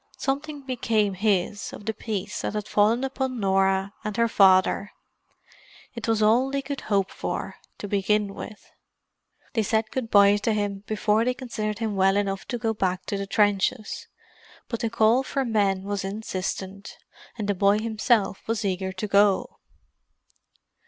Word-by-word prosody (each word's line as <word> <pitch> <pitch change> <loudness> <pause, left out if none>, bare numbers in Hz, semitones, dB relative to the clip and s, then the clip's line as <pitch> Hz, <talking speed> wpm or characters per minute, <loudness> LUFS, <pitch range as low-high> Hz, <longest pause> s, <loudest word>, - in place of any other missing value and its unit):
Something 285 +2 -3
became 230 -6 0
his 205 0 0
of 205 - -10
the 220 - -1
peace 210 -2 -4
that - - -3
had 210 -1 -3
fallen 220 +5 +3
upon 265 -2 -2
Norah 195 0 +1
and 215 0 -4
her 230 0 +3
father. 195 -1 +4 1.0
It 235 -3 -6
was 225 -1 +2
all 235 +5 +4
they 275 0 -2
could 280 0 -5
hope 200 -3 0
for, - - -4 0.2
to 205 - -6
begin 205 0 +1
with. 215 - -10 0.8
They 225 - +2
said 220 +1 0
good 255 -4 -3
bye 200 -1 +6
to 215 +2 0
him 205 -1 -2
before 215 0 +1
they 250 +1 0
considered 220 -5 -4
him 220 -2 -2
well 195 +1 +3
enough 195 -1 -2
to 245 - -2
go 225 -1 -1
back 185 -3 -1
to 200 - -2
the 200 - -4
trenches. 205 +2 0 0.6
But 230 - -3
the 230 - -1
call 230 +2 +3
for 270 0 -2
men 200 -4 +1
was 200 0 -3
insistent, 195 -1 -5 0.4
and 210 -3 -3
the 205 - +2
boy 200 +2 +3
himself 215 -2 +1
was 225 -1 -1
eager 190 0 -1
to 190 +3 -4
go. 200 -1 +2
210 Hz, 165 wpm, -25 LUFS, 195-230 Hz, 1.0 s, bye